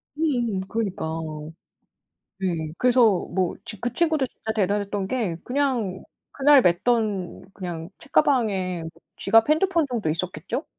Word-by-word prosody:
음음. 240 -11 0
그러니까 205 -7 -2 1.3
네 165 -5 -2
그래서 250 0 +4 0.3
뭐 185 -1 0
지 210 -3 -6
그 245 0 -3
친구도 315 -4 +2
진짜 220 -2 -6
대단했던 200 -1 0
게 210 -10 -1
그냥 250 -8 -1 0.3
그날 280 -1 +6
맸던 200 0 0
그냥 175 -3 -6
책가방에 185 - +1 0.3
지갑, 225 +5 +4
핸드폰 335 0 +3
정도 230 -10 -2
있었겠죠? 175 +3 -3
215 Hz, 255 characters per minute, -24 LUFS, 185-255 Hz, 1.3 s, 그날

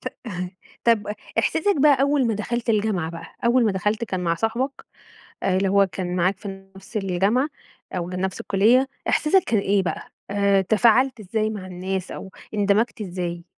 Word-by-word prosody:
ط - - -2 0.8
طَب 230 -3 +3 0.3
إحساسك 400 +6 +2
بقى 285 -2 +5
أول 280 -2 +3
ما 225 - +1
دخَلت 235 +3 -2
الجامعة 205 -6 0
بقى، 165 0 -8 0.2
أول 240 0 +4
ما 210 - +2
دخَلت 210 +4 0
كان 185 -5 -3
مع 170 -2 +1
صاحبك 235 +9 -2 0.6
اللي 190 +1 +2
هو 200 +1 +4
كان 180 +1 -4
معاك 185 +2 +1
في 195 -2 -9
نفْس 195 +4 -10
الجامعة 200 +7 +1 0.4
أو 175 -1 -3
نفْس 185 +1 -3
الكُلِّية، 235 +7 +3 0.2
إحساسك 365 +5 +3
كان 225 - +2
إيه 200 0 +2
بقى، 180 - -4 0.2
آآ 200 -1 +3
تفاعلت 230 +5 +3
إزاي 215 +2 -1
مع 205 -4 -6
الناس 185 +1 -4
أو 190 - -8 0.2
اندمجت 210 +2 +1
إزاي؟ 175 -3 -4
200 Hz, 165 wpm, -23 LUFS, 185-235 Hz, 0.8 s, بقى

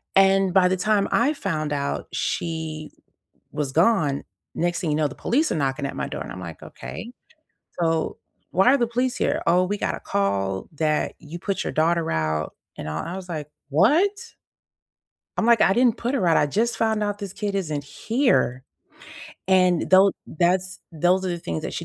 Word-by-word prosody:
And 195 -1 +4
by 185 -2 +5
the 185 - +1
time 205 +1 +2
I 270 +6 +3
found 155 - -2
out 140 0 -2
she 160 -2 -3 0.6
w 150 - -7
was 140 -3 -1
gone, 165 -6 +2 0.3
next 175 +1 0
thing 160 -4 -1
you - - +1
know, 150 -1 +2
the - - -10
police 300 +6 +1
are - - 0
knocking 140 -1 -1
at - - -7
my - - -3
door. - - -5
And - - -9
I'm 90 - -7
like, 85 -3 -8
"Okay. 235 - -8 0.7
So 165 -1 0 0.3
why 190 +6 +4
are - - +3
the 235 - +1
police 250 +2 0
here?" - - 0
"Oh, 180 +2 +4
we 205 +2 -2
got - - -1
a - - -9
call 100 -1 -1
that 155 0 0
you 160 +2 -8
put 195 - -2
your - - -3
daughter 165 +1 +1
out." 80 -1 -1 0.2
And, 75 - -5
uh, 75 +1 -3
I 175 - -5
was 185 -1 -8
like, 150 -3 -5 0.2
"What?" 365 - +2 1.0
I'm 225 - +1
like, 235 -1 +5
"I 190 - +5
didn't 240 0 +3
put 245 +4 -2
her 210 -9 +1
out, 165 - +4
I 145 - +3
just 230 +10 0
found 220 -1 +1
out 205 0 -2
this 200 -3 -6
kid 205 -1 -3
isn't 155 -7 -2
here." 220 - 0 0.8
And 185 -2 +3
though 190 +1 +7
that's 185 +3 0
those 180 +4 +2
are - - -1
the 175 - -2
things 85 - -4
that - - -4
she - - -4
180 Hz, 200 wpm, -24 LUFS, 150-205 Hz, 1.0 s, though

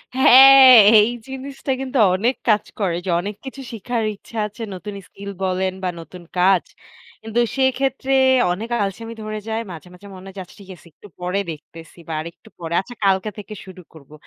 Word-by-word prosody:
হ্যাঁ, 265 +1 +8 0.3
এই 215 +3 +1 0.2
জিনিসটা 270 +1 -6
কিন্তু 265 0 -4 0.2
অনেক 235 +7 0
কাজ 210 -1 +3 0.2
করে। 185 -5 -1
যে, - - -4
অনেক 205 +2 -6
কিছু 270 +1 -8
শিখার 230 +1 -3
ইচ্ছা 225 +3 -13
আছে। 210 +3 -14
নতুন 205 +3 -8
স্কিল 200 0 -9
বলেন 185 0 -1
বা 185 - 0
নতুন 175 +1 -12
কাজ। 185 0 +3 0.6
কিন্তু 225 +1 -3 0.2
সেক্ষেত্রে 265 0 0 0.4
অনেক 210 +6 -5
আলসামি 225 +4 -6
ধরে 215 0 -5
যায়। 220 +1 -2
মাঝে, 170 +1 -11
মাঝে, 180 +3 -15
মনে 185 +1 -12
হয় 190 0 -9
আচ্ছা 180 - -19
ঠিক 195 - -16
আছে। 170 - -20
একটু 205 - -16
পরে 180 +2 -2
দেখতেছি 160 +2 -13
বা 160 - -5
আরেকটু 170 +1 -12
পরে। 165 0 -6
আচ্ছা 245 +4 -13
কালকে 190 +2 +1
থেকে 210 0 -9
শুরু 185 -1 -12
করবো। 150 -2 -17
200 Hz, 180 wpm, -20 LUFS, 180-240 Hz, 0.6 s, হ্যাঁ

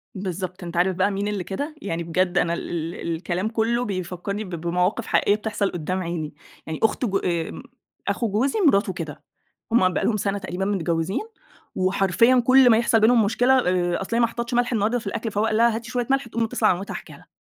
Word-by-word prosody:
بالضبط، 185 -1 -5
أنت 170 0 -6
عارف 180 +1 +2
بقى 190 +3 +2
مين 200 +1 -2
اللي 205 -3 -2
كده؟ 285 - -5
يعني 170 -6 -3
بجد 180 +2 0
أنا 170 -1 +2
ال 170 0 -4
ال 170 - -3
الكلام 180 +5 -2
كُلّه 235 +2 0
بيفكّرني 185 +2 -4
ب 190 - -9
بمواقف 180 +6 -1
حقيقية 205 - +3
بتحصل 210 -2 -2
قُدّام 185 +3 -3
عيني. 165 -3 -4 0.3
يعني 160 -1 -4
أخت 225 +3 +2
جو 195 -3 +1
آمم 170 -4 -3 0.4
أخو 230 - 0
جوزي 260 - +1
مراته 200 -6 +3
كده. 160 -5 -7 0.5
هم 185 -6 +4
بقي - - -1
لهم 220 - +1
سَنة 200 0 -1
تقريبًا 190 -1 -4
متجوِّزين 175 -2 -1 0.5
وحرفيًا 195 +6 +3
كل 260 -1 +7
ما 225 - +6
يحصل 235 -1 +3
بينهم 225 0 +5
مشكلة 245 +5 +3 0.2
آآ 175 -1 0
أصل 195 +4 -3
هي - - +2
ما 235 - +4
حطِّتش 235 +1 -5
ملح 245 +1 +1
النهاردة 225 +2 +1
في 220 - -9
الأكل، 225 +2 -3
فهو 205 +2 0
قال 215 -1 +1
لها: 235 0 +4
"هاتي 230 +1 -6
شوية 245 -2 -1
ملح." 270 -2 +1
تقوم 230 0 -1
متّصله 225 - +1
على - - +3
مامتها 195 - -6
حاكيه - - -8
لها. - - -20
200 Hz, 215 wpm, -23 LUFS, 180-230 Hz, 0.5 s, كل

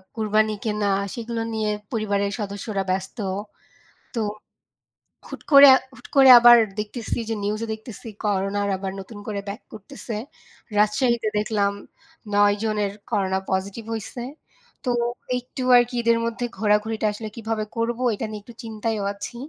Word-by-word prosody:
কুরবানি 215 -1 +2
কেনা, 210 -1 0 0.3
সেগুলো 235 -1 -4
নিয়ে 215 -1 -1 0.2
পরিবারের 200 -3 0
সদস্যরা 200 0 -3
ব্যস্ত। 190 +1 -2 1.0
তো 235 - -2 1.1
হুট - - -8
করে, 280 0 +10 0.3
হুট 245 - -14
করে 270 -1 +8
আবার 240 0 +9 0.2
দেখতেছি 220 +2 -4
যে - - 0
নিউজ 210 +2 -2
দেখতেছি 220 +1 -10 0.2
করোনা 200 -1 0 0.2
আবার 190 0 -4
নতুন 195 +3 -10
করে 210 -2 -3
ব্যাক 200 +4 -6
করতেছে। 225 +2 -8 0.6
রাজশাহীতে 220 +2 +2
দেখলাম, 210 -1 +1 0.6
৯ 205 0 +4
জনের 210 -2 0 0.2
করোনা 190 -3 +1
পজিটিভ 195 +4 -2
হইছে। 225 +2 -6 0.6
তো, 255 - -2 0.5
একটু 250 +2 -7 0.2
আরকি 245 +1 +2
ঈদের 230 0 +3
মধ্যে 235 +1 -2
ঘোরাঘুরিটা 215 +2 +1
আসলে 215 +1 -6
কিভাবে 225 -2 -3
করব, 230 +1 -1 0.2
এটা 225 - -4
নিয়ে 215 -1 -7
একটু 235 - -13
চিন্তায়ও 220 -1 -3
আছি। 200 +4 -8
215 Hz, 135 wpm, -23 LUFS, 205-230 Hz, 1.1 s, করে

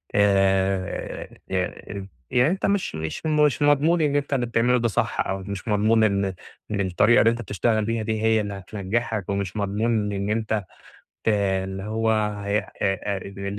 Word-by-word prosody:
آآ 95 -2 +1 0.2
ي - - -1
إ 100 -1 -8 0.2
يعني 125 +4 +4
أنت 190 - -1
مش 200 - 0
مش 80 - -5
مش 150 -4 +2
مضمون 145 +4 +4
إن 145 -2 +1
أنت 145 0 0
اللي 125 -3 +1
بتعمله 120 +1 +2
ده 120 - +1
صح 110 - -1
أو 95 - -1
مش 95 +2 -6
مضمون 110 +1 +3
إن 100 -2 +2 0.5
إن 100 -1 0
الطريقة 100 +5 +4
اللي 115 - +5
أنت 115 0 -4
بتشتغل 110 +1 0
بيها 115 0 -1
دي 110 0 -2
هي 110 0 +3
اللي 100 -1 -4
هتنجحك، 100 +2 -3
ومش 100 -1 -2
مضمون 105 +1 0
إن 100 +1 -2
أنت 110 -1 0 0.6
ت - - +1
اللي 95 -2 0
هو 110 +2 0
ه 105 -2 -1
أ - - -4 0.2
أ 100 0 0
اللي 100 +1 -6
إن 100 +1 -4
105 Hz, 180 wpm, -24 LUFS, 100-115 Hz, 0.6 s, اللي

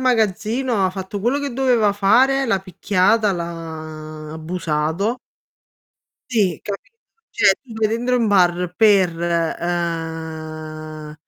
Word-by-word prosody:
magazzino, 230 -1 +1
ha 185 - +2
fatto 190 +1 -5
quello 245 +7 +1
che 285 -3 -3
doveva 240 -5 +3
fare, 250 +7 +4
l'ha 210 -4 +2
picchiata, 195 +3 +2
l' 175 - -3
ha 155 -2 -7
abusato. 160 +5 -1 1.1
Sì, 195 -9 +1
capito, 205 - -7 0.3
cioè 195 - +5
tu 240 -4 -12
sei 220 -1 +2
dentro 245 +3 0
un 235 - +2
bar 180 -3 +2
per, 200 -5 +5
ehm 160 -2 -3
185 Hz, 115 wpm, -20 LUFS, 165-225 Hz, 1.1 s, cioè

